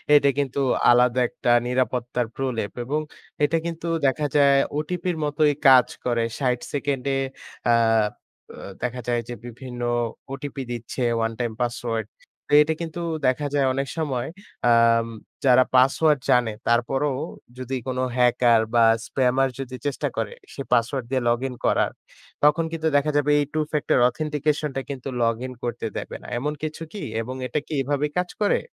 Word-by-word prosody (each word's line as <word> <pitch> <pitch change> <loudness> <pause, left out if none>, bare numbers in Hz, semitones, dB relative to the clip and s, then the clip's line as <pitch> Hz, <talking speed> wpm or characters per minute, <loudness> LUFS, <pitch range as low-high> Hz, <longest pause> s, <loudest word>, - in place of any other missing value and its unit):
এটা 140 -1 +5
কিন্তু 140 -1 -1 0.3
আলাদা 125 +1 +4
একটা 120 - -3 0.2
নিরাপত্তার 125 -1 -1
প্রলেপ 125 -6 -2
এবং 150 +4 -1 0.4
এটা 165 +3 +3
কিন্তু 170 0 -4 0.2
দেখা 140 +3 +1
যায় 140 -1 +5 0.2
ওটিপির 175 +2 -2
মতোই 150 0 +2
কাজ 130 -1 +7 0.2
করে। 120 -2 +1 0.2
৬০ 125 -3 +1
সেকেন্ডে 140 -2 -1 0.6
আ - - +5 0.8
অ - - -14 0.3
দেখা 125 0 -2
যায় 120 -1 +1
যে 120 - -3
বিভিন্ন 120 +1 -8 0.5
ওটিপি 135 0 -5
দিচ্ছে 120 +2 -5 0.2
ওয়ান 115 0 0
টাইম 120 -2 -1
পাসওয়ার্ড। 120 -2 -2 0.4
তে - - -4
এটা 160 +1 -1
কিন্তু 165 +1 -5 0.3
দেখা 145 +3 +1
যায় 140 -2 +2
অনেক 135 0 -2
সময় 135 -6 -1 0.4
আম 115 0 +4 0.4
যারা 130 0 +6
পাসওয়ার্ড 140 +3 +4
জানে 120 -2 +4 0.2
তারপরেও 130 +4 +1 0.4
যদি 130 +1 -4
কোন 130 0 -2 0.2
হ্যাকার 120 -2 +4
বা 115 - +6 0.2
spammer 135 0 +2
যদি 130 -1 -5
চেষ্টা 145 +1 -1
করে 110 -2 -2 0.2
সে 140 - -6
পাসওয়ার্ড 120 +1 +1
দিয়ে 130 -2 0
লগইন 125 +2 0
করার, - - +2 0.5
তখন 150 +3 +4
কিন্তু 160 -1 -1
দেখা 150 +2 +1
যাবে 145 0 +2
এই 145 - +1
Two 155 0 +1
factor 150 0 +2
authentication 150 0 -1
টা 135 - -1
কিন্তু 135 -1 -5
লগইন 115 +3 -1
করতে 120 -1 -3
দেবে - - -5
না। - - -12
এমন 150 +4 -2
কিছু 155 +1 -4
কি? 205 - -6 0.2
এবং 130 +3 -6
এটা 150 +5 -1
কি 155 - -6
এভাবেই 145 +2 -1
কাজ 180 0 0
করে? 205 - +3
135 Hz, 160 wpm, -24 LUFS, 120-150 Hz, 0.8 s, কাজ